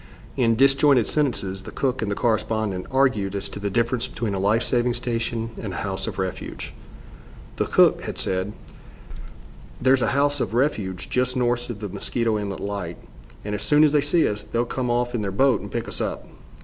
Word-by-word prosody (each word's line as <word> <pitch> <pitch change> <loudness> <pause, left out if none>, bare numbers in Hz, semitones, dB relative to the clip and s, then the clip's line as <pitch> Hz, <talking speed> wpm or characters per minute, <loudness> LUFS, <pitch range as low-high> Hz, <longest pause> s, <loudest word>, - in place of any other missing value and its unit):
In 115 -4 +3
disjointed 135 -1 +5
sentences 100 -10 -1
the - - -9
cook 130 -1 -1
and 110 - -1
the 100 - -1
correspondent 110 -4 0
argued 130 -8 +1
as 100 - -3
to - - -7
the 100 0 -2
difference 115 +4 0
between 115 -3 -3
a 95 - -1
life 105 +4 +2
saving 120 -1 +1
station 115 -2 -2
and 100 -4 -5
a - - -3
house 95 -1 -2
of - - -5
refuge. 95 -1 -4 0.8
The - - +1
cook - - +4
had - - -6
said: 95 +2 -1 1.3
"There's 130 0 +4
a - - +2
house 145 0 +2
of 115 - -2
refuge 100 - 0
just 125 0 0
north 120 0 0
of 110 -3 -6
the 105 - -3
Mosquito 110 +3 0
Inlet 100 -2 -4
Light, 100 -4 -4 0.5
and 105 - -3
as 105 - -3
soon 150 +1 +4
as 150 - +5
they 150 -1 +4
see 155 +3 +3
us, 105 0 -2
they'll 115 +3 -1
come 125 +1 -2
off 120 0 0
in 120 - -1
their 100 - -2
boat 120 +3 +3
and - - -8
pick - - -3
us - - -4
up." - - -3
115 Hz, 200 wpm, -24 LUFS, 100-125 Hz, 1.3 s, disjointed